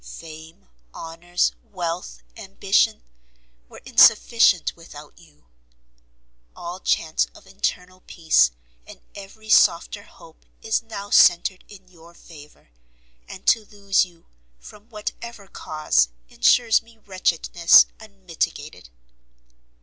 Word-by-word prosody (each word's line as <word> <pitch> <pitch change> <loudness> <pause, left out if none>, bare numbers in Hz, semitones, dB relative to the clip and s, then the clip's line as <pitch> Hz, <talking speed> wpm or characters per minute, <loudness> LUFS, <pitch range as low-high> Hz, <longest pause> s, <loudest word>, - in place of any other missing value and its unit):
Fame, 160 - -13 0.3
honours, 170 +2 -2
wealth, 170 - -6
ambition, - - 0 0.7
were - - -15
insufficient - - +4
without - - -15
you; 75 +1 -23 1.1
all 175 +2 -8
chance 160 -4 -1
of - - -17
internal 185 -1 -5
peace, 160 - +2 0.4
and - - -14
every 205 +2 -13
softer 205 0 +3
hope 165 -5 -19 0.2
is 220 0 -1
now 205 -3 -9
centered 180 +2 +4
in 190 -3 -16
your 170 -1 -19
favour, 150 - -17 0.6
and - - -12
to 225 - +3
lose 200 -2 0
you, 175 -3 -13 0.3
from 210 - -16
whatever 215 0 -8
cause, 155 - -1 0.2
ensures 235 -3 +3
me 230 0 -22
wretchedness 175 -4 +3
unmitigated. 175 - -6
180 Hz, 105 wpm, -22 LUFS, 160-205 Hz, 1.1 s, insufficient